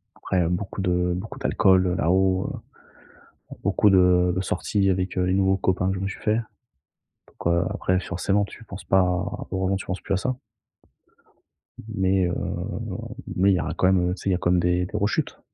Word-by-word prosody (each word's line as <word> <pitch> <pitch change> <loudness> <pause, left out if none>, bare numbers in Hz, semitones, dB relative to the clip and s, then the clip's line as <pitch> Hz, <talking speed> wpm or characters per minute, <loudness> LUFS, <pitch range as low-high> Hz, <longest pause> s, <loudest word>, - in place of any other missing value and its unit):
après 90 -3 0
beaucoup 95 +2 -3
de 90 -1 +1
beaucoup 95 +5 -7
d'alcool, 95 -1 +3
heu, 90 - 0
là-haut, 95 +2 +2 1.0
heu, - - -7
beaucoup 105 - +3
de 90 -2 +4
de 95 - 0
sorties 95 +2 0
avec, 95 -1 -1
heu, 90 - +2
les 90 - +1
nouveaux 95 0 +2
copains 95 0 0
que 95 - -1
je - - -4
me 95 - -2
suis 100 - -7
faits 110 +2 +1 0.9
donc, - - -12
heu, 85 0 +2
après 90 0 0
forcément 95 +3 0
tu 115 - -11
penses 95 -2 -9
pas 95 0 +4 0.5
heureusement, 95 0 0
tu 95 - -6
penses 95 - -3
plus 100 - -2
à - - +2
ça 125 +7 -2 1.6
mais, 95 -1 +2
heu, 85 - -1 1.0
mais 95 +2 +4
il 95 - +3
y - - -1
aura 80 +2 -3
quand - - +1
même, 90 -1 +2
heu, - - -1
tu - - -11
sais, - - -2
il - - +3
y - - +3
a - - 0
quand 85 - 0
même 90 0 +3
des 90 +1 +1
des 100 - -5
rechutes. 105 0 -1
95 Hz, 210 wpm, -24 LUFS, 90-95 Hz, 1.6 s, de